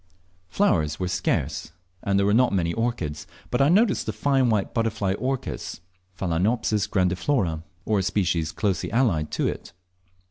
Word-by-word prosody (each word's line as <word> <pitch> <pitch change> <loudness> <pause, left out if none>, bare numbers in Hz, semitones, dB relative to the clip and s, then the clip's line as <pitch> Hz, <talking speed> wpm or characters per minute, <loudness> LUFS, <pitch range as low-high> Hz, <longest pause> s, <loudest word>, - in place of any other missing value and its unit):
Flowers 80 - +1
were 90 - -1
scarce, 90 -3 -1 0.3
and 100 0 +1
there 100 - +3
were 100 - +3
not 125 +2 +4
many 85 -3 0
orchids, 115 -11 -2 0.2
but - - +1
I 140 - +5
noticed 205 - +3
the - - 0
fine 130 +3 +2
white 105 -3 0
butterfly 110 -4 0
orchis, 130 -1 -3 0.4
Phalaenopsis 105 +4 0
grandiflora, 90 - +1 0.2
or 105 -2 +2
a - - +1
species 90 -5 0
closely 100 +1 -1
allied 110 -11 +1
to - - +1
it. - - -5
100 Hz, 150 wpm, -25 LUFS, 90-120 Hz, 0.4 s, I